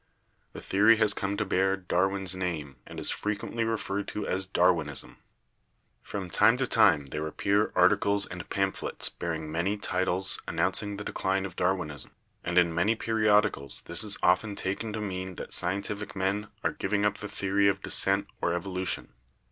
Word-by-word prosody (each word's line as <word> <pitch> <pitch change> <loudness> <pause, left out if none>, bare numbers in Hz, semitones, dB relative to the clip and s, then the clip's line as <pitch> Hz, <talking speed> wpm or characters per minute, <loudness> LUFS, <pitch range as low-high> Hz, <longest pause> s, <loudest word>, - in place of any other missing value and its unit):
The - - -8
theory 110 +3 +4
has 110 -1 +4
come 100 0 -2
to 105 - 0
bear 95 0 +1
Dar 90 0 +1
win's 95 -2 -3
name 80 -7 -4
and - - -8
is - - 0
frequently 105 +2 -2
referred 105 -3 -2
to 105 - -4
as 95 0 -1
'Darwinism/ 85 -6 +1 0.8
From 100 -3 -5
time 115 +4 +5
to 130 - +1
time 70 -2 +4
there 75 +1 -3
appear 100 +6 +1
articles 100 0 +4
and 90 -1 -8
pamphlets 95 -1 -1
bearing 80 -2 -4
many 90 +6 0
titles 95 -1 0
announcing 105 -1 0
the 105 - -5
decline 95 -1 -1
of 90 -3 -7
Darwinism, 90 -6 -1 0.3
and 85 +1 -2
in 85 -2 +4
many 95 +7 +2
periodicals 105 - +1
this 85 +5 +1
is 105 -2 +1
often 95 +4 +3
taken 100 +4 -3
to 110 - -3
mean 95 -2 -4
that - - -7
scientific 100 +3 -1
men 100 +2 -1 0.2
are - - +2
giving 105 -1 -1
up 105 +2 0
the 105 - -6
theory 100 +1 +1
of 100 -1 0
descent 100 +1 +2 0.2
or 85 +1 +1
evo 95 +1 -7
lution. 95 0 -2
95 Hz, 170 wpm, -28 LUFS, 90-105 Hz, 0.8 s, time